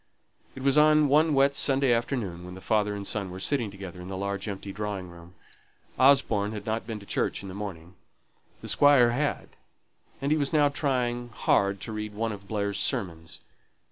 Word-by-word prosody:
It 130 - -8
was 140 +2 +4
on 155 -1 +5
one 155 +1 +4
wet 140 +1 +4
Sunday 135 -2 +2
afternoon, 115 -8 -2
when 90 0 -9
the - - -9
father 105 +1 0
and 100 -1 -6
son 100 -2 -3
were 90 +1 -7
sitting 120 +1 0
together 95 -2 -9
in 90 - -9
the 95 0 -5
large 100 +1 -3
empty 100 -1 -5
drawing 100 -3 -4
room. 85 +1 -14 0.6
Osborne 115 -6 +4
had 105 -1 -7
not 110 0 -2
been 110 -2 -5
to - - -12
church - - -1
in 100 - -7
the - - -7
morning; 95 -4 -7 0.7
the - - -8
Squire 140 -5 +5
had, 140 +4 -2 0.7
and 140 +2 -2
he 155 - +3
was 140 +2 0
now 145 -2 +4
trying 125 -4 -1
hard 100 -3 +1
to 115 - -6
read 105 -1 -5
one 115 +1 -1
of 100 -1 -9
Blair's 100 -1 -2
sermons. 85 -10 -3
105 Hz, 195 wpm, -27 LUFS, 100-135 Hz, 0.7 s, on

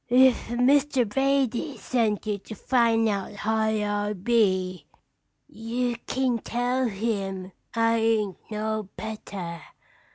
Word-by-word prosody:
"If 255 0 +5
Mr. 260 +1 +3
Brady 270 +2 0
sent 225 -5 0
you 210 -1 -1
to 220 - -9
find 230 -1 +2
out 200 -1 -2
how 220 +2 -1
I 210 -1 0
be, 185 -6 +1 0.6
you 240 +2 -2
kin 255 -3 +1
tell 245 +3 0
him 195 -3 -3 0.2
I 230 0 +3
ain't 220 -4 +1
no 215 -1 -2
better. 195 -6 -6
220 Hz, 110 wpm, -26 LUFS, 205-245 Hz, 0.6 s, If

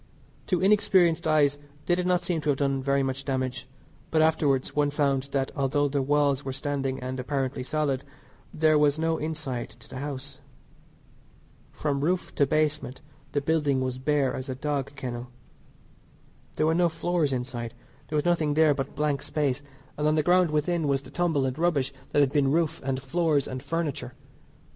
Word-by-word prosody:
To 180 - +1
inexperienced 185 -4 +3
eyes 145 -2 +3 0.3
they 175 - +2
did 180 0 0
not 180 -1 +2
seem 175 -2 -1
to 150 - -2
have 140 - +2
done 135 -1 0
very 140 0 +1
much 135 +1 -3
damage, 130 -2 -2 0.4
but 160 - +2
afterwards 150 -4 +2
one 145 -1 +3
found 140 -2 0
that 135 -1 0
although 145 0 +1
the 140 0 0
walls 145 0 +2
were 135 - -3
standing 135 -1 -2
and 130 +1 -4
apparently 135 0 -2
solid 140 -1 -1 0.5
there 155 -1 +3
was 145 0 +3
no 160 0 0
inside 150 -6 -4
to 110 - -15
the 130 - -7
house. 140 -1 -6 1.3
From 140 -2 -2
roof 180 +5 0
to 140 - +2
basement 150 -3 0 0.3
the 145 - +1
building 145 -2 +1
was 130 -1 -2
bare 140 -1 +1
as 130 +1 -5
a 130 - -2
dog 140 0 -3
kennel. 125 -2 -5 1.3
There 155 - +1
were 160 - +3
no 175 +1 +3
floors 165 -2 0
inside, 120 -2 -4 0.3
there 155 - -4
was 150 - +1
nothing 160 -4 +2
there 155 -1 +5
but 135 -1 -4
blank 150 -2 0
space; 145 -3 -1 0.4
and 150 - +2
on 155 - +3
the 155 - +2
ground 180 0 +4
within 155 +1 0
was 140 -1 +1
the 130 - -13
tumble 160 -5 +1
and 130 +3 -3
rubbish 145 -6 +1 0.2
that 145 - +4
had 135 -2 +3
been 145 -3 +3
roof 165 0 +1
and 130 0 -1
floors 145 +1 +1
and 130 0 -5
furniture. 155 0 -3
145 Hz, 180 wpm, -27 LUFS, 135-155 Hz, 1.3 s, there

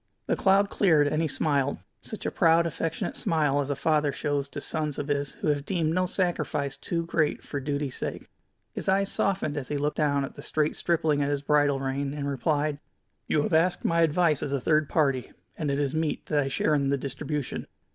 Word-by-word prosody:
The - - +1
cloud 200 0 +3
cleared 160 -7 +4
and 155 +2 0
he 165 - +1
smiled, 140 -1 0 0.2
such 220 - -7
a - - 0
proud, 170 -1 +4
affectionate 165 0 -3
smile 150 -4 +1
as 140 - -4
a 140 - 0
father 150 +1 +2
shows 145 -1 -2
to - - -6
sons 150 0 -2
of 145 - -4
his 140 -1 0
who - - -2
have 145 -1 +1
deemed 165 -2 0
no 185 +1 +1
sacrifice 175 -7 -1
too 170 -1 -3
great 155 -2 0
for 145 - -4
duty's 140 -1 -3
sake. - - -5 0.5
His - - -3
eyes 195 +1 +2
softened 185 -7 0
as 135 -3 -4
he 145 - -2
looked 145 +1 -1
down 140 -2 +2
at - - -9
the - - -10
straight 155 0 0
stripling 160 -4 +1
at 140 - +1
his 145 -1 -1
bridle 145 -2 +3
rein, 135 +1 -2
and 145 -1 -3
replied: 145 +1 0 0.5
"You 150 - +2
have - - -2
asked 170 +3 +2
my 170 0 +3
advice 165 -2 +3
as 140 - -3
a 140 - +1
third 155 +3 +2
party, 135 -5 +1 0.2
and 155 -3 -2
it 140 0 0
is 140 -2 0
meet 160 -1 -1
that 150 - +1
I 135 - +1
share 145 +3 +1
in 140 -2 +2
the 140 - +2
distribution. 145 +1 -4
150 Hz, 215 wpm, -27 LUFS, 140-160 Hz, 0.5 s, cleared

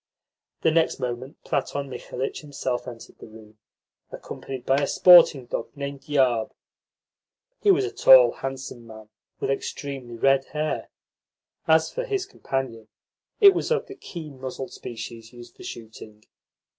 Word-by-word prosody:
The 160 - +4
next 165 0 +1
moment 125 +2 -5
Platon 140 0 -2
Mikhalitch 130 0 -5
himself 135 -4 -4
entered 120 -2 -11
the - - -11
room, 110 -1 -16 0.5
accompanied 130 -2 -8
by 135 - +3
a 140 - +1
sporting 170 -7 +7
dog - - -4
named 140 +1 -6
Yarb. 125 -6 +2 1.1
He 415 - +3
was 395 +1 +4
a 395 - -4
tall, - - +7
handsome 135 -3 -7
man, 110 -1 -12 0.3
with - - -1
extremely 135 -3 -5
red 135 +2 +3
hair. 155 0 -2 0.8
As 160 0 +4
for - - -2
his 400 -6 -2
companion, 120 -5 -4 0.5
it 400 -3 +9
was - - -2
of 470 -1 +1
the 400 - -10
keen 155 - -9
muzzled 130 0 -6
species 115 0 -8
used 120 -1 -13
for - - -13
shooting. 110 -2 -10
135 Hz, 145 wpm, -25 LUFS, 120-160 Hz, 1.1 s, it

